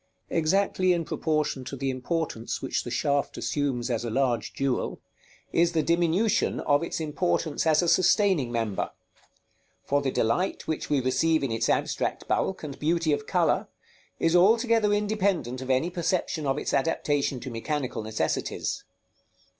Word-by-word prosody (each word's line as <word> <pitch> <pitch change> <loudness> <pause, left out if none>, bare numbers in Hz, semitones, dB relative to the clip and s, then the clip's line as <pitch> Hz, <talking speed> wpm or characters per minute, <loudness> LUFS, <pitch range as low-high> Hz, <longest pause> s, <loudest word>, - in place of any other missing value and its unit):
_ - - -3
Exactly 185 +2 +2
in 170 -2 -1
proportion 150 -5 -1
to 140 - -5
the 135 0 -1
importance 130 -2 -3
which - - -2
the - - -6
shaft 140 0 0
assumes 130 -4 -1
as 115 -1 -1
a 120 - -3
large 125 0 0
jewel, 135 -2 -2 0.5
is 170 +1 +3
the 160 -2 +2
diminution 175 +7 +2
of 145 0 +2
its 170 - -3
importance 160 0 -1
as 160 +2 +4
a - - 0
sustaining 185 - +3
member; 115 -4 -1 1.0
for 145 0 +1
the 140 - 0
delight 130 +10 0
which 160 -1 -3
we 145 -2 +2
receive 140 +5 +2
in 135 - -1
its 115 0 0
abstract - - -1
bulk, 190 - 0
and 140 -2 -7
beauty 165 0 +1
of 145 0 -3
color, - - +1 0.5
is 165 +1 +2
altogether 225 +3 +4
independent 200 - 0
of 130 - -7
any 130 +7 +2
perception 175 -3 -1
of 135 +1 +1
its - - -3
adaptation 145 -2 0
to 130 - -7
mechanical 130 +2 -3
necessities. 110 0 -2
150 Hz, 155 wpm, -27 LUFS, 130-175 Hz, 1.0 s, as